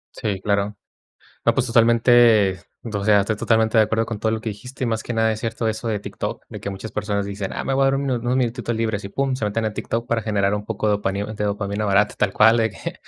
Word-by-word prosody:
Sí, 100 -3 -2
claro. 100 0 0 0.7
No, - - +3
pues, - - +1
totalmente, 115 -4 +4 0.2
o 105 -3 -3
sea, 105 -1 +5
estoy 105 +2 -1
totalmente 110 0 +2
de 110 - +7
acuerdo 115 +1 0
con 115 - -4
todo 110 +1 0
lo 110 - -2
que 110 - -4
dijiste. 125 +6 -9
Y - - 0
más 110 -1 -1
que 120 - -4
nada 110 0 +2
es 110 - -2
cierto 115 0 -2
eso 110 +2 -4
de 105 -2 -1
TikTok, - - -5
de - - -8
que - - -5
muchas 100 +3 -7
personas 100 -1 -2
dicen: 100 -1 -5
"Ah, - - -3
me 135 - -1
voy 135 - +2
a - - +4
dar 135 - +3
un 135 0 -1
unos 120 +1 0
minutitos 120 -1 -1
libres", 110 -3 -2
y - - -5
pum, 135 +4 -1
se 115 - -3
meten 105 +2 -1
en 110 - -1
TikTok 115 +1 -3
para 115 -1 +1
generar 100 -2 +1
un 105 0 -4
poco 110 0 -3
de - - +3
dopani 100 0 -2
de 105 0 -4
dopamina 100 +1 -2
barata 100 +1 +2
tal 95 - +1
cual, 110 +4 +5
de 110 -1 +2
que 95 - -7
110 Hz, 265 wpm, -22 LUFS, 100-115 Hz, 0.7 s, de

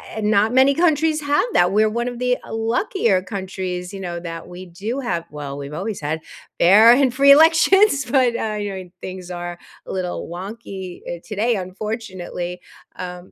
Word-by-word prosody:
eh, 220 - -3
not 210 +1 +2
many 265 +2 +5
countries 315 -1 +2
have 290 +5 +1
that. 175 +1 +4
We're 215 +2 +3
one 235 +2 -2
of 245 -1 -5
the 250 0 0
luckier 225 - 0
countries, 185 -1 -5
you 195 - -6
know, 175 -2 -5
that 165 -1 -7
we 180 +1 -9
do 200 +9 -5
have 175 -10 -2
well, 145 -2 -7
we've 140 +1 -7
always 195 +5 -4
had 155 +2 -3 0.4
fair 210 +6 +7
and 260 -1 +3
free 280 +2 +6
elections, 325 +2 +5
but, 260 -3 +3
uh, 215 -2 -2
yeah, 195 -2 -4 0.2
things 185 -1 -8
are 175 -1 -6 0.3
a - - -7
little 180 -2 -3
wonky, 190 0 -8 0.2
uh, - - -15
today, 225 +2 0
unfortunately. 185 -2 -5 0.3
Um, 180 0 -8
200 Hz, 170 wpm, -21 LUFS, 180-245 Hz, 0.4 s, fair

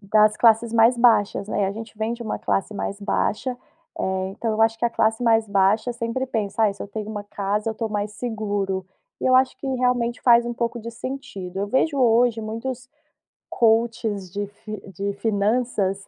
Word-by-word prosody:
das 215 +1 +4
classes 230 0 +4
mais 230 +2 +5
baixas, 225 -4 +3
né, 205 - -1
e - - +3
a 195 - -2
gente 225 0 -9
vem 220 +2 -1
de 235 - -8
uma 220 - -3
classe 195 +2 -1
mais 200 0 -4
baixa, 210 +4 -1 0.5
eh, 190 0 -1
então 225 +3 -3
eu 220 +1 +2
acho 225 0 +2
que 240 - -2
a - - -2
classe 225 +1 +1
mais 225 -2 +3
baixa 200 +4 +2
sempre 235 +2 -3
pensa: 220 -2 -1
"Ai, 205 -2 +4
se 195 - -9
eu - - -8
tenho 210 +1 -5
uma 205 -1 -4
casa 205 +2 -2
eu 220 - -2
tô 225 0 -3
mais 210 0 -3
seguro", 205 -5 -3 0.3
e - - -1
eu 255 - +4
acho 260 0 +4
que 275 - -7
realmente 250 -2 0
faz 235 -1 +5
um 240 - -3
pouco 235 0 -2
de 230 +1 -6
sentido. 235 -7 -6
Eu 200 - -1
vejo 275 +6 +1
hoje 235 -1 +3
muitos 240 +4 -5 0.6
coaches 225 -4 +1
de 205 +1 -3
fi 205 +1 -9
de 200 +3 -3
finanças 205 -1 0
220 Hz, 200 wpm, -23 LUFS, 205-235 Hz, 0.6 s, mais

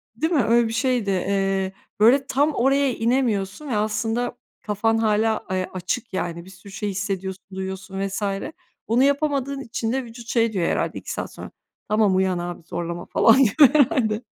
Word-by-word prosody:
Değil 320 +2 -1
mi? 280 - +3
Öyle 230 +1 +3
bir 225 - -4
şeydi. 240 -3 0
Eee, 195 0 0 0.3
böyle, 265 +5 +5
tam 290 +3 +2
oraya 270 +1 +2
inemiyorsun 230 0 -1
ve 240 - -1
aslında 220 +3 -1 0.2
kafan 225 +2 0
hâlâ, 220 0 +1
eee, 185 0 -1
açık 185 +5 -3
yani 170 -1 -3
bir - - -13
sürü 190 +1 -14
şey 205 +1 -3
hissediyorsun, 195 -1 -4
duyuyorsun 190 +1 -4
vs. 195 +2 -5 0.7
Bunu 235 +4 +3
yapamadığın 280 -1 0
için 230 -2 -3
de 265 +1 -1
vücut 235 0 -11
şey 230 -2 +1
diyor 180 -4 0
herhâlde - - -1
2 - - -7
saat - - -5
sonra: - - -9 0.4
"Tamam 210 -3 +3
uyan 190 -1 +1
abi 175 -1 -6
zorlama 170 0 -5
falan 225 - +5
diyor 270 +2 +6
herhâlde." 255 -7 +2
220 Hz, 170 wpm, -23 LUFS, 190-250 Hz, 0.7 s, diyor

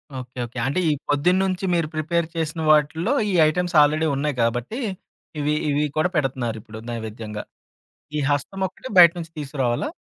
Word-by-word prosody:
Okay. 130 0 -8
Okay. 120 +2 -12
అంటే 140 +7 0
ఈ - - +3 0.2
పొద్దున్నుంచి 180 +6 +1
మీరు 170 -2 +1
ప్రిపేర్ 165 +2 0
చేసిన 160 0 -2
వాటిల్లో, 160 - +2 0.2
ఈ - - -1
ఐటెమ్స్ 180 +3 -1
ఆల్రేడీ 155 +2 +3
ఉన్నాయి 145 +1 -1
గాబట్టి, 120 - -1 0.6
ఇవి, 150 +1 +1
ఇవి 145 +1 +1
కూడా 155 +3 +2
పెడుతన్నారిప్పుడు 120 -6 -2
నైవేద్యంగా. 110 -2 -5 0.7
ఈ - - +1
హస్తం 145 +7 -2
ఒక్కటి 225 - -10
బయట 170 -2 +9
నుంచి 165 -1 -7
తీసుకురావాలా? 135 - -1
150 Hz, 150 wpm, -23 LUFS, 125-170 Hz, 0.7 s, బయట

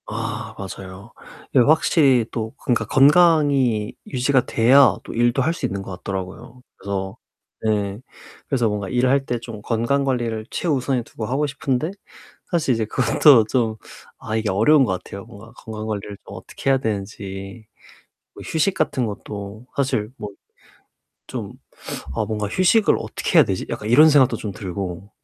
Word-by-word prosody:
아 - - -5
맞아요. 95 +2 -9 0.4
이게 135 - +5
확실히 135 -2 +4
또 110 -1 -4
그러니까 115 -2 +1
건강이 140 -6 +4
유지가 130 0 +1
돼야 120 -1 +5
또 - - -8
일도 120 +3 +2
할 160 +5 +1
수 - - -4
있는 100 0 -3
것 95 - -8
같더라고요. 95 +6 -7
그래서 95 -1 -5 0.5
예. 105 -2 -1 0.5
그래서 125 -4 +1
뭔가 105 -2 -3
일을 125 +1 +2
할 135 0 +2
때 120 -2 -2
좀 115 -2 -9
건강관리를 120 -1 -1
최우선에 135 -6 -1
두고 110 -1 -7
하고 135 +4 0
싶은데 135 +2 -2 0.6
사실 160 -7 +1
이제 115 -1 -1
그것도 120 +2 +5
좀 115 -3 0 0.5
아 110 - -3
이게 110 -1 -1
어려운 130 +9 +4
것 95 -5 -2
같아요. 100 0 -9
뭔가 110 +3 -14
건강관리를 110 -3 -6
좀 - - -10
어떻게 - - -5
해야 135 - +4
되는지 100 -1 -5 0.7
뭐 - - -10
휴식 165 +4 0
같은 135 -7 0
것도 100 +1 -8
사실 130 -6 0
뭐 105 - -6 1.0
좀 - - -6 0.6
'아 110 - 0
뭔가 105 -1 -2
휴식을 185 - +3
어떻게 - - 0
해야 - - +8
되지?' - - -3
약간 105 - -5
이런 150 +6 +7
생각도 140 -4 +4
좀 105 - -5
들고. 95 0 -6
115 Hz, 315 characters per minute, -21 LUFS, 105-135 Hz, 1.0 s, 해야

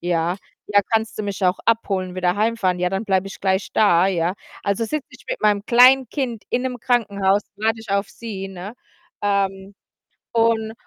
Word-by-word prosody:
„Ja.“ 175 0 0 0.3
„Ja, 205 0 +4
kannst 220 0 0
du - - -1
mich 200 -1 -3
auch 180 +1 +2
abholen, 195 -5 0
wieder 180 0 0
heimfahren?“ 210 -4 +1
„Ja, 180 - +2
dann 195 +3 -2
bleibe 190 -2 +1
ich - - -11
gleich 190 0 0
da.“ 185 -4 +4
„Ja.“ 180 -1 0 0.3
Also, 200 +3 0
sitze 285 +5 -3
ich 260 - -16
mit - - -3
meinem 210 -1 +2
Kleinkind 250 -1 +4
in 245 - 0
'nem 255 -1 -3
Krankenhaus, 200 -5 +1
warte 220 +2 0
ich 220 -2 -10
auf 200 +1 0
sie, 200 -5 -7
ne? 190 +3 -8 0.5
Ähm, 195 -1 -1 0.6
und 225 -1 +1
205 Hz, 175 wpm, -21 LUFS, 190-225 Hz, 0.6 s, Ja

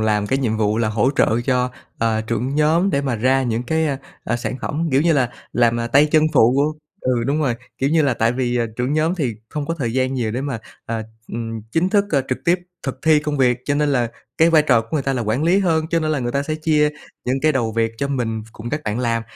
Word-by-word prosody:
làm 105 -1 +1
cái 135 - 0
nhiệm 115 -5 0
vụ 110 0 +1
là 115 - +1
hỗ 110 +4 +2
trợ 115 +2 +3
cho, 125 -1 +1 0.3
ờ, 110 -1 +1
trưởng 115 +5 -2
nhóm 160 +6 +3
để 140 - +1
mà 130 -4 -1
ra 130 +4 +2
những 120 -1 -1
cái, 160 +5 0
a, 140 -3 -1 0.3
ờ, - - 0
sản 120 +1 -4
phẩm, 165 +3 -1
kiểu 135 - +4
như 170 0 +3
là, 130 -5 +2 0.2
làm, 120 -1 +3
ờ, 115 - -1
tay 140 +5 +5
chân 155 -1 +5
phụ 140 +4 +3 0.3
ừ, 125 -2 +1
đúng 150 +3 +1
rồi. 125 -5 +1 0.2
Kiểu 135 +2 +1
như 160 -1 +4
là 135 -4 +2
tại 115 0 +1
vì, 125 -1 -1
à, 120 - +1
trưởng 125 +3 -1
nhóm 155 +3 +1
thì 135 -11 -1
không 150 -1 -4
có 165 - -1
thời 120 -4 -1
gian 130 +1 0
nhiều 120 -4 -1
để 125 +4 -2
mà, 135 -4 -3 0.3
à, 115 -1 -2 0.3
ừm, 115 -1 -4
chính 170 +3 +2
thức, 200 0 +3
ơ, 140 -3 +2
trực 130 - -1
tiếp 175 +1 +3 0.2
thực 135 -1 -4
thi 155 -1 +5
công 150 -1 -3
việc, 125 -2 +3
cho 145 - 0
nên 150 0 +1
là 125 -5 +1 0.3
cái 165 +1 +5
vai 155 -2 +5
trò 115 - +4
của 115 - -11
người 150 - +1
ta 135 +1 0
là 125 - -1
quản 115 +6 0
lý 175 +4 +4
hơn, 165 -5 +1
cho 165 - +2
nên 155 -1 -1
là 150 - +1
người 120 -1 -2
ta 140 - 0
sẽ 155 +2 -3
chia 155 -1 +2 0.3
những 125 +1 0
cái 155 0 +4
đầu 120 -5 0
việc 115 0 0
cho 140 - -1
mình 115 -5 -2
cùng 120 +2 -7
các 150 +1 -2
bạn 110 +2 -2
làm. 115 -2 0
130 Hz, 275 wpm, -20 LUFS, 115-150 Hz, 0.3 s, tay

